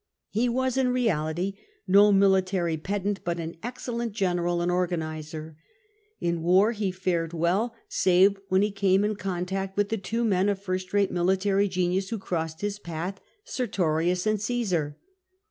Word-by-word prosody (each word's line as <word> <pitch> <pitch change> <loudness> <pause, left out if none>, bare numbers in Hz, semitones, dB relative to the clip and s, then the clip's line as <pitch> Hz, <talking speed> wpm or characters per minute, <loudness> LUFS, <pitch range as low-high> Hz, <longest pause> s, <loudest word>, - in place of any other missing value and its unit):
He 235 +4 +1
was 260 +1 0
in 265 -1 +3
reality 185 -7 0 0.3
no 200 +2 +6
military 190 -3 +3
pedant 200 +4 -2
but 170 0 -2
an 165 0 -5
excellent 235 -2 -4
general 175 -4 0
and 175 +1 0
organiser. 160 -3 -3 0.6
In 170 -1 -1
war 185 +6 +4
he 210 -4 -1
fared 175 -3 -1
well, 185 +8 0
save 190 +2 +4
when 190 +2 +3
he 210 - 0
came 195 -1 +2
in 210 0 0
contact 190 0 -3
with 205 0 +2
tlie 225 -3 -2
two 230 +3 -1
men 195 -3 +2
of 200 -1 -1
first 185 -1 -3
rate 200 -1 +2
military 190 +3 +2
genius 185 +1 0
who 230 - -2
crossed 165 -5 -3
his 205 0 -2
path, 175 +2 -5 0.2
Sertorius 180 - 0
and 215 -1 +1
Csosar. 195 -10 -1
190 Hz, 155 wpm, -26 LUFS, 175-205 Hz, 0.6 s, no